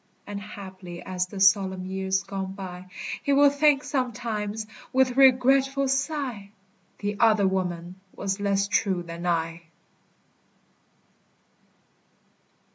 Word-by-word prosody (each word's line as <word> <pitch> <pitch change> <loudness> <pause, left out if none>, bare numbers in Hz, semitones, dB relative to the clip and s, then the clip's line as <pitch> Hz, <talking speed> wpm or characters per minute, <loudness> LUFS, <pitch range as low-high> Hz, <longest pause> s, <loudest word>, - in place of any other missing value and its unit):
And 205 0 -6
haply 190 -4 -9
as 185 -1 -2
the 195 +1 -8
solemn 190 -1 +3
years 190 0 -1
go 195 -1 -5
by, 190 -1 -7 0.3
He 280 - +1
will 285 0 +6
think 285 0 +3
sometimes, 220 -5 -2 0.3
with 260 -1 +2
regretful 270 +1 +4
sigh, 270 -6 -2 0.5
The 205 0 -3
other 215 -4 +4
woman 180 -1 -3 0.2
was 195 0 -2
less 200 0 +1
true 195 -4 +1
than 170 +1 -6
I. 165 -1 -1
200 Hz, 110 wpm, -26 LUFS, 190-255 Hz, 0.5 s, will